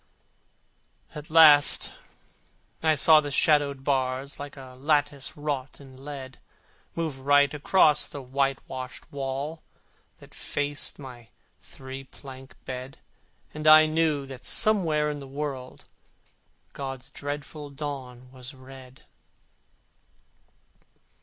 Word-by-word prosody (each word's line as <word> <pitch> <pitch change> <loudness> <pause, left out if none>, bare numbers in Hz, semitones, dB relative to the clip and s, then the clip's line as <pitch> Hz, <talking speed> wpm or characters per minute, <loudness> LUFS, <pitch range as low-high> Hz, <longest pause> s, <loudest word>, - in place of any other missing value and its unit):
At 150 0 -9
last 155 -3 +6 0.9
I 160 -1 +3
saw 155 +2 +7
the 145 - -5
shadowed 140 -1 +3
bars, 135 0 -1
Like 145 0 -8
a 130 -1 -11
lattice 145 0 0
wrought 145 -2 -4
in 135 -1 -14
lead, 135 -3 -8 0.6
Move 160 -5 -3
right 145 +1 +4
across 150 +1 +3
the 145 - -8
whitewashed 130 -1 -3
wall 140 +3 -4 0.6
That - - -17
faced 145 0 -3
my 125 -5 -11 0.3
three 130 0 -9
plank 135 -1 -13
bed, 130 +1 -7 0.6
And 155 0 -3
I 155 0 +9
knew 155 -2 +1
that 135 -2 -10
somewhere 160 -8 +2
in 145 - -6
the 140 - -9
world 135 -2 -6 0.9
God's 135 -1 -6
dreadful 145 +1 -6
dawn 135 -3 -7
was 130 +1 -9
red. 130 0 -14
140 Hz, 105 wpm, -26 LUFS, 130-150 Hz, 0.9 s, I